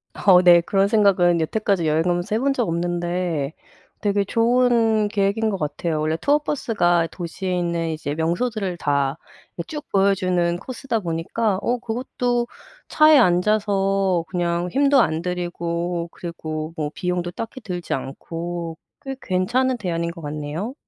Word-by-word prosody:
어 185 -3 +5
네 175 -1 +7
그런 195 +3 +2
생각은 190 -5 +3
여태까지 195 0 0
여행 155 +1 +2
가면서 175 +4 0
해 - - +1
본 275 +1 +1
적 240 -7 -1
없는데 175 -3 -2 0.5
되게 205 -1 +1
좋은 230 -1 +2
계획인 205 +1 0
것 195 - -2
같아요. 155 0 -2
원래 155 +1 0
투어 290 - +2
버스가 175 - +1
도시에 180 +2 -4
있는 170 -1 -1
이제 155 -2 -3
명소들을 185 +3 -1
다 140 0 0 0.4
이 170 - -3
쭉 300 -1 -6
보여주는 185 -3 +2
코스다 240 +3 -3
보니까 185 +4 -1
어 245 +3 0
그것도 245 +1 -2 0.4
차에 310 -1 +6
앉아서 195 -2 +2
그냥 175 -1 -1
힘도 275 0 +4
안 160 -5 0
들이고 175 -1 -3
그리고 160 -2 -5
뭐 150 -1 -2
비용도 180 -1 -2
딱히 230 +7 -6
들지 180 -6 -4
않고 165 +5 -5 0.3
꽤 270 0 -4
괜찮은 245 +8 +1
대안인 170 -4 -2
것 170 0 -11
같네요? 150 - -4
180 Hz, 300 characters per minute, -22 LUFS, 170-215 Hz, 0.5 s, 네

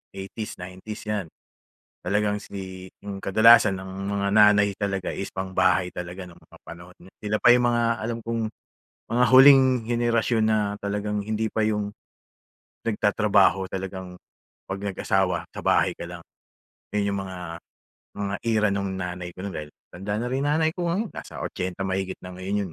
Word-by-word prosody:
80's 100 +3 -6
90's 95 +4 -8
'yan. 105 -3 -1 0.8
Talagang 105 0 +1
si 95 -2 -8 0.2
'yung 100 -1 -5
kadalasan 110 0 +6
ang 95 0 -8 0.2
mga 100 0 0
nanay 105 -1 +6
talaga 95 -2 -2
is 95 - -4
pang-bahay 95 -1 +1
talaga 90 +1 -6
no'ng 85 - -15
mga - - -18
panahon, 85 +2 -11
na 95 - -15
sila 105 0 -1
pa - - +6
'yung 125 0 +3
mga 120 -1 +2 0.2
alam 115 +1 -2
kong 115 0 -2 0.7
mga 125 +1 +4
huling 135 +1 +9 0.2
henerasyon 120 -1 +1
na 110 0 +3 0.2
talagang 105 +1 -2
hindi 110 +1 -1
pa 110 - 0
'yung 105 -1 0 0.9
nagtatrabaho 105 -3 +3
talagang, 95 -1 -5 0.5
'pag 95 - -3
nag-asawa, 95 -3 0
sa - - -7
bahay - - +3
ka - - -6
lang. - - -9 0.7
'Yun 100 -1 +1
'yung 100 - -2
mga 95 -1 -7 0.8
mga 100 0 -2
era 110 -2 +3
nung 100 -1 -1
nanay 90 -1 -5
ko 95 - -7
no'n 100 - -5
dahil 75 -1 -5 0.2
matanda 95 +3 -4
na - - -2
rin 135 +2 0
nanay 160 +2 +2
ko 175 -1 -2
ngayon, 205 +5 -1
nasa - - -8
80 90 +1 -4
mahigit 95 0 -2
na 90 - -8
ngayon 95 0 -2
'yun. - - -13
100 Hz, 165 wpm, -25 LUFS, 95-110 Hz, 0.9 s, huling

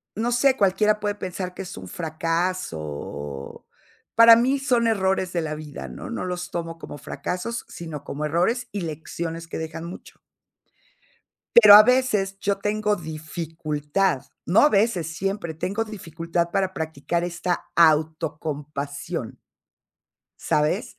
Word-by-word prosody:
no 235 +3 -1
sé, 260 +2 +4
cualquiera 210 +2 +3
puede 205 -1 -1
pensar 185 -1 -5
que 190 - -7
es 180 - -8
un 95 0 -8
fracaso 165 - -2
o, 70 -2 -7 0.5
para 230 0 +10
mí 265 +4 +2
son 245 -4 +2
errores 190 -4 +1
de 170 - 0
la 155 -1 -3
vida, 150 - -8
¿no? 60 - -8
No - - -4
los 180 -1 -4
tomo 165 -1 -4
como 145 - -9
fracasos, 230 +11 -4
sino 160 -4 -7
como 150 +2 -5
errores 205 - +1
y 200 - -2
lecciones 165 +1 -5
que - - -5
dejan 160 0 -5
mucho. 175 - -10 1.4
Pero 210 -3 +10
a 210 - +12
veces 215 -6 +2
yo 200 0 0
tengo 210 +1 0
dificultad. 155 0 -2 0.2
No 180 +6 +4
a 295 - +7
veces, 190 - +1
siempre 195 -4 -2
tengo 200 +8 -2
dificultad 170 -4 -3
para 190 -1 0
practicar 160 +1 -2
esta 175 0 -2
autocompasión. 150 -2 0 1.0
¿Sabes?, 150 +7 0
175 Hz, 135 wpm, -24 LUFS, 155-205 Hz, 1.4 s, a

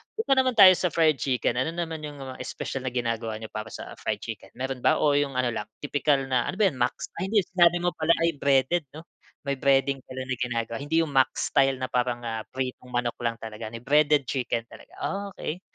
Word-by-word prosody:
Punta 445 -10 -2
naman 255 -2 +2
tayo 195 -3 +10
sa 180 - +2
fried 155 -4 +3
chicken, 125 -3 0
ano 160 +5 0
naman 165 -2 -3
yung 145 -1 -7
mga 130 -1 -7
espesyal 135 -1 -5
na - - -1
ginagawa 115 -2 -2
niyo 110 -1 -8
para 110 0 -5
sa - - -8
fried - - -2
chicken? - - -7
Meron 130 0 -4
ba - - +3
o 150 - +4
yung 140 -2 0
ano 125 -1 +1
lang 105 -2 -4 0.2
tipikal 145 -1 +1
na 125 -2 +1
ano - - -3
ba 205 -1 +4
yun 130 - -11
Max? 120 0 -1
Ay 190 - -1
hindi 210 -2 +3
sinabi 175 -1 +4
mo 175 - +2
pala 160 0 +3
ay 165 -3 +1
breaded 140 +4 +2
'no? 160 - -9 0.4
May 140 -1 -1
breading 135 -1 +3
pala 130 0 -5
na 130 0 -2
ginagawa, 115 -2 -2
hindi 160 +3 +1
yung 145 - -8
max 130 -1 +2
style 135 -1 +4
na 130 - -2
parang, 125 -1 -1
ah, 115 -1 -3
pritong 130 -1 -5
manok 120 -1 -1
lang 115 -1 -1
talaga, 110 -1 -7
ni 115 - -7
breaded 145 +3 +3
chicken 120 -2 -2
talaga. - - -15 0.5
Okey. 170 +4 -4
135 Hz, 225 wpm, -26 LUFS, 120-155 Hz, 0.5 s, tayo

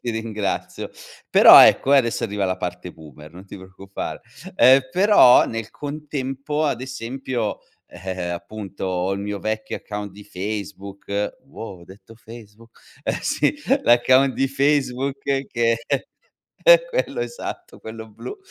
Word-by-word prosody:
ti 120 - -2
ringrazio. 110 -3 -4 0.4
Però - - +9
ecco, 135 - +4
e - - +7
adesso 115 -3 -1
arriva 105 -2 -2
la 95 0 -1
parte 90 -1 -6
boomer, 75 0 -14
non 95 +3 -13
ti - - -10
preoccupare. 95 +1 -8 0.4
Ehm, 130 +2 +7
però 185 -9 +6
nel 115 -1 -5
contempo, 145 0 -4
ad 140 -5 -1
esempio, 130 -2 -4 0.3
ehm, 90 -2 -6
appunto, 100 +2 -7
ho 95 +1 -1
il 100 - -3
mio 105 0 -4
vecchio 110 +1 -4
account 105 -1 -7
di 105 +1 -13
Facebook, 100 +1 -5
wow, 110 -9 -9
ho 85 - -15
detto 100 +5 -16
Facebook, 115 0 -15 0.2
eh - - -2
sì, - - 0 0.3
l'account 130 +3 +4
di 135 0 0
Facebook, 135 -1 0 0.3
che 115 -1 0 0.9
è - - +7
quello - - -2
esatto, 415 -8 -7
quello 110 0 -9
blu, 400 - -9
110 Hz, 140 wpm, -22 LUFS, 100-135 Hz, 0.9 s, Però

